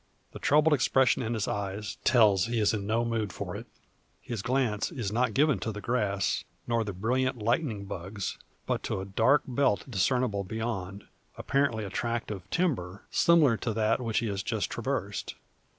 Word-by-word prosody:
The - - -9
troubled 150 +2 +4
expression 130 -2 +3
in 120 0 -2
his 105 -3 -1
eyes, 100 +1 -3
tells 105 -7 +5
he 120 0 -1
is 105 0 +3
in 100 -2 -3
no 115 +2 +1
mood 110 -4 -1
for - - -5
it. - - -7 0.5
His 115 -4 -5
glance 120 - 0
is 120 - -3
not 125 +3 +1
given 150 0 +3
to 110 - -3
the 105 - -6
grass, 105 -4 0 0.2
nor 115 -1 +1
the 105 - -4
brilliant 125 +7 0
"lightning 115 -1 0
bugs," 95 +1 -5 0.3
but - - -1
to - - -2
a 95 - -4
dark 115 +9 +3
belt 130 -4 +1
discernible 115 -1 +1
beyond, 100 -2 -4 0.3
apparently 135 -6 0
a 100 - -6
tract 115 +2 -2
of 95 -4 -7
timber, 105 - -1
similar 155 -9 +5
to 115 - -2
that 110 +2 +2 0.2
he 120 - +1
has 100 -3 -2
just - - -2
traversed. - - -3
110 Hz, 175 wpm, -29 LUFS, 100-125 Hz, 0.5 s, tells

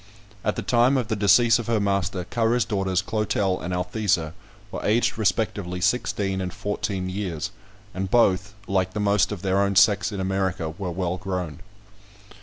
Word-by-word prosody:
At 105 - 0
the - - -4
time 125 +3 +3
of 125 -5 -2
the 110 - 0
decease 110 +3 +5
of 120 - -5
her 115 -2 +2
master, 100 -2 0
Currer's 115 +3 +1
daughters, 95 -3 0
Clotel 100 -2 0
and 90 - -4
Althesa, 90 -3 0 0.4
were - - -5
aged 115 +2 +2
respectively 100 -3 -1
sixteen 95 -1 0
and 90 -1 -3
fourteen 95 0 -3
years, 95 -5 -3 0.4
and 95 +1 -3
both, 100 -2 +2
like 95 -1 -1
most 105 -2 +2
of 100 -3 -6
their 95 0 +2
own 100 0 +1
sex 100 +1 +4
in 100 - -5
America, 95 -3 -1
were 90 +3 -5
well 90 +1 -2
grown. 90 -3 -4
100 Hz, 165 wpm, -24 LUFS, 90-105 Hz, 0.4 s, decease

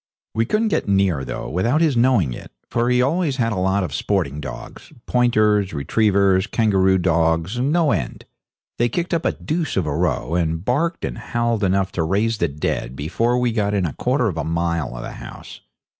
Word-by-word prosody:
We 115 0 0
couldn't 220 - +1
get - - -1
near, 95 -8 +2
though, - - -5
without 115 - +1
his 160 -5 +2
knowing 115 - +3
it, - - -10 0.2
for 120 +1 +1
he 125 0 +3
always 155 +1 0
had 115 -3 0
a 95 - -2
lot 95 +1 +1
of 90 - -4
sporting 80 -8 -1
dogs - - -9
pointers, 105 -6 +2
retrievers, 95 +5 +2
kangaroo 95 -4 +2
dogs, 85 +3 +1
no 150 +4 +2
end. 80 - -3 0.5
They 120 +1 +3
kicked 175 +8 -2
up 165 - 0
a - - +3
deuce 160 - -3
of 95 - +1
a 75 -1 -2
row, 85 -1 -1
and 80 0 -1
barked 165 +8 0
and - - -5
howled 120 -2 -1
enough 95 0 +1
to 85 - -2
raise 105 +6 0
the 85 - +2
dead, 70 -4 -3
before 90 - 0
we 125 -1 +1
got 105 -2 0
within 100 -3 +1
a 75 - -3
quarter 125 -1 0
of 90 -6 -3
a 80 - -1
mile 85 -3 -1
from - - -7
the - - -6
house. - - -10
100 Hz, 200 wpm, -21 LUFS, 85-120 Hz, 0.5 s, knowing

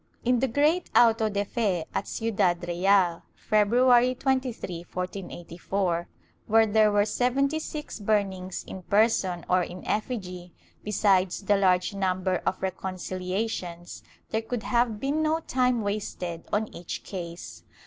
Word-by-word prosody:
In 250 0 +3
the 265 - +2
great 300 +8 +2
auto 225 -2 +5
de 205 0 -1
fe 195 -7 -1
at - - -2
Ciudad 180 -6 0
Real, 175 0 +2
February 245 +4 +4
23, 255 -9 -2
1484, 175 0 -3 0.4
where 225 +1 +5
there 215 0 +4
were 205 0 +3
seventy 265 +7 +1
six 305 -5 -6
burnings 195 -3 -1
in 190 - -8
person 195 -3 +1
or 180 0 +3
in 180 +1 -6
effigy, 185 -6 -3 0.3
besides 195 -2 +2
the 205 +1 +3
large 185 -2 +2
number 185 -1 0
of 185 - -1
reconciliations, 185 -1 -4 0.3
there 220 - 0
could 225 0 -4
have 235 -3 +1
been 280 +5 0
no 315 +1 +1
time 250 -5 +1
wasted 185 -5 -4
on 215 +1 -1
each 175 - -6
case. 170 -3 -7
205 Hz, 130 wpm, -27 LUFS, 180-235 Hz, 0.4 s, auto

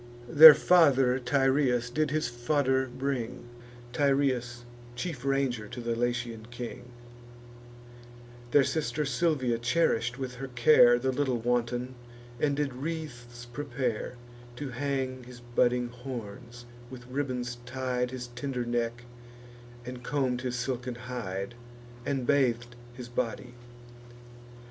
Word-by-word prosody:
Their 155 +3 +11
father 135 -7 +4
Tyrrheus 130 -1 +1
did 155 +3 0
his 155 -1 0
fodder 130 +2 0
bring, 125 -2 -4 0.5
Tyrrheus, 130 -4 +1 0.3
chief 130 0 -5
ranger 135 -5 0
to 120 - -8
the 115 -1 -2
Latian 120 -2 -2
king: 120 0 -7 1.6
Their 140 +3 +5
sister 150 +2 -1
Silvia 135 -4 0
cherish'd 120 -2 +1
with 130 -2 -5
her 135 +2 -5
care 120 -1 +6
The 130 +2 0
little 130 -2 0
wanton, 120 +1 -1 0.5
and 145 -2 +1
did 145 -2 -1
wreaths 125 -5 -6
prepare 125 -2 -3 0.4
To 145 +2 -5
hang 130 -1 -3
his 125 0 -12
budding 120 0 +1
horns, 120 -1 -8 0.2
with 125 -1 -10
ribbons 125 -2 -3
tied 125 -1 -2
His 125 -1 -6
tender 125 0 -4
neck, 120 0 -2 0.8
and 125 0 -7
comb'd 130 -2 -1
his 125 -1 -3
silken 125 -1 -3
hide, 120 -5 -5 0.5
And 135 -3 -1
bathed 120 -3 +1 0.2
his 125 -1 -8
body. 120 +1 -3
125 Hz, 115 wpm, -29 LUFS, 120-135 Hz, 1.6 s, Their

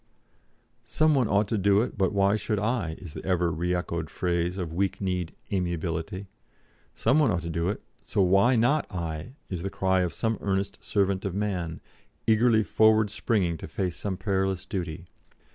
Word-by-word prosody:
'Some 155 +8 +2
one 130 -5 +3
ought 100 +1 +2
to 110 +1 0
do 100 +2 +4
it, - - -5
but 95 -1 +1
why 100 0 +3
should 105 0 -1
I?' 105 -6 -1
is 90 -6 -10
the - - -7
ever 90 -2 +1
re 90 +3 0
echoed 85 -2 -3
phrase 90 0 -1
of 85 -4 -4
weak 95 +2 0
kneed 90 -3 -2 0.2
amiability. 85 0 -2 0.7
'Some 150 - +3
one 150 - +4
ought 85 -5 0
to 85 - -4
do 85 +2 0
it, 105 - -4 0.2
so - - -3
why 100 +8 +4
not 130 +6 +2
I?' 85 +5 -4 0.2
is 90 -3 -3
the 95 - -2
cry 95 -1 +1
of 90 -2 0
some 110 -1 -1
earnest 100 0 -2
servant 100 -2 +1
of 95 -2 -3
man, 90 -6 -2 0.4
eagerly 110 0 +4
forward 110 -1 +4
springing 95 -6 0
to - - -8
face 90 -3 -2
some 95 -3 -3
perilous 95 -1 -1
duty. 85 -3 -4
95 Hz, 180 wpm, -27 LUFS, 85-105 Hz, 0.7 s, do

